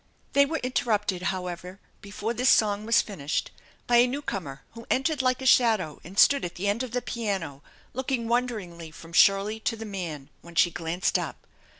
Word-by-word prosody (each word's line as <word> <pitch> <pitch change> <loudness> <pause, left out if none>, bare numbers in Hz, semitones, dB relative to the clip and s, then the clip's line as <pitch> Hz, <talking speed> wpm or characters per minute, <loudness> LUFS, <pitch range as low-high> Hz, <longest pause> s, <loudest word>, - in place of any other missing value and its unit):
They 280 0 +5
were 320 +2 -2
interrupted, 210 -7 0
however, 180 0 -5 0.2
before 205 +3 -4
this 250 +2 +2
song 210 0 +3
was 230 - +4
finished 155 -8 -3 0.3
by 240 - +4
a 240 +1 +6
newcomer 195 - -5
who 230 0 -12
entered 275 +2 +1
like 255 +1 0
a - - -5
shadow 220 - +3
and 185 +4 -12
stood 280 +5 +5
at 175 0 -5
the 195 +3 -3
end 205 +4 +1
of 255 - -3
the 245 +1 -3
piano 190 - -3 0.3
looking 255 -2 -2
wonderingly 215 -9 -2
from 165 +1 -13
Shirley 200 +4 +4
to 225 +1 -1
the 225 0 -7
man, 170 -9 -6
when 170 0 -14
she 175 +1 +4
glanced 165 +2 -1
up. - - -6
210 Hz, 185 wpm, -26 LUFS, 175-245 Hz, 0.3 s, a